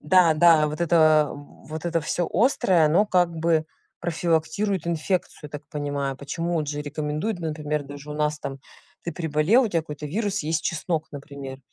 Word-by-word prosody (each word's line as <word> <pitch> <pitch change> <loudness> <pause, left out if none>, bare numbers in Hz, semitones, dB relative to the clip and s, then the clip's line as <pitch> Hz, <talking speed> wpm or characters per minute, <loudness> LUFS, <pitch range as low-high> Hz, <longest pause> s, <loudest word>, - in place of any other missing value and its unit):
да, 170 +1 +5
да, 155 -1 +5
вот 150 +3 -6
это 155 -3 +4
вот 155 +2 -10
это 170 -1 0
всё 170 +3 -1
острое, 190 - +3
оно 175 +8 +3
как 180 -3 +3
бы 160 -1 +1 0.3
профилактирует 170 +3 0
инфекцию, 170 +2 -1
я - - -6
так 145 0 -7
понимаю. 145 -2 -3
Почему, 165 +5 -2
от 150 - -4
же 145 0 -3
рекомендуют, 150 +7 -3
например, 150 -2 -2
даже 145 +1 -10
у - - -4
нас 150 0 0
там 135 -2 -6 0.4
ты 170 - -3
переболел, 160 - +3
у - - 0
тя 170 -4 +1
какой-то 150 -2 -6
вирус 200 +3 -1
и - - -5
есть 160 -1 0
чеснок, 160 -1 -2
например. 140 -2 -8
155 Hz, 180 wpm, -24 LUFS, 150-170 Hz, 0.4 s, да